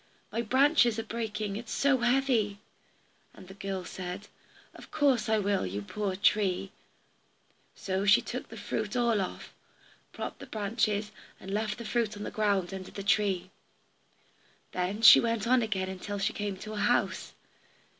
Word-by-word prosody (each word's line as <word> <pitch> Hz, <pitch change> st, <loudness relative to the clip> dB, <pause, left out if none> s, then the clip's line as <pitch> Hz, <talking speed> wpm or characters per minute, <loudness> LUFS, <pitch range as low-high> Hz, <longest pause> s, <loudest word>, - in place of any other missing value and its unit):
My 230 Hz, -, -1 dB
branches 260 Hz, 0 st, +4 dB
are 225 Hz, -, -2 dB
breaking, 215 Hz, -3 st, -3 dB
it 235 Hz, -, -7 dB
is -, -, -9 dB
so 275 Hz, -2 st, +2 dB
heavy." 240 Hz, -4 st, +2 dB, 0.8 s
And 185 Hz, -, -13 dB
the 190 Hz, -, -10 dB
girl 195 Hz, -2 st, -5 dB
said, 185 Hz, +2 st, -7 dB, 0.4 s
"Of -, -, -13 dB
course 275 Hz, -7 st, +2 dB
I 220 Hz, -, +3 dB
will, 200 Hz, -1 st, +1 dB
you 100 Hz, +2 st, -4 dB
poor 195 Hz, -, -3 dB
tree." 195 Hz, -2 st, +1 dB, 1.0 s
So 190 Hz, 0 st, -2 dB
she 200 Hz, -, +6 dB
shook -, -, -5 dB
the -, -, -10 dB
fruit -, -, -3 dB
all 235 Hz, -4 st, +2 dB
off, 185 Hz, -, -6 dB, 0.6 s
propped -, -, -6 dB
up -, -, -33 dB
the -, -, -10 dB
branches, 210 Hz, 0 st, 0 dB, 0.3 s
and 190 Hz, -, -8 dB
left 210 Hz, +2 st, -1 dB
the 235 Hz, -, -7 dB
fruit 220 Hz, -1 st, -1 dB
on 205 Hz, -, -6 dB
the -, -, -5 dB
ground 200 Hz, -4 st, 0 dB
under 190 Hz, -1 st, -7 dB
the 200 Hz, -, -7 dB
tree. 195 Hz, -3 st, +1 dB, 1.2 s
Then 190 Hz, +5 st, -2 dB
she -, -, +11 dB
went 230 Hz, -2 st, 0 dB
on 250 Hz, +1 st, +4 dB
again 190 Hz, -4 st, -2 dB
till 205 Hz, +2 st, -4 dB
she 195 Hz, -, 0 dB
came 205 Hz, -2 st, -3 dB
to 215 Hz, +3 st, -8 dB
a -, -, -5 dB
house. 205 Hz, -3 st, 0 dB
210 Hz, 170 wpm, -29 LUFS, 195-230 Hz, 1.2 s, she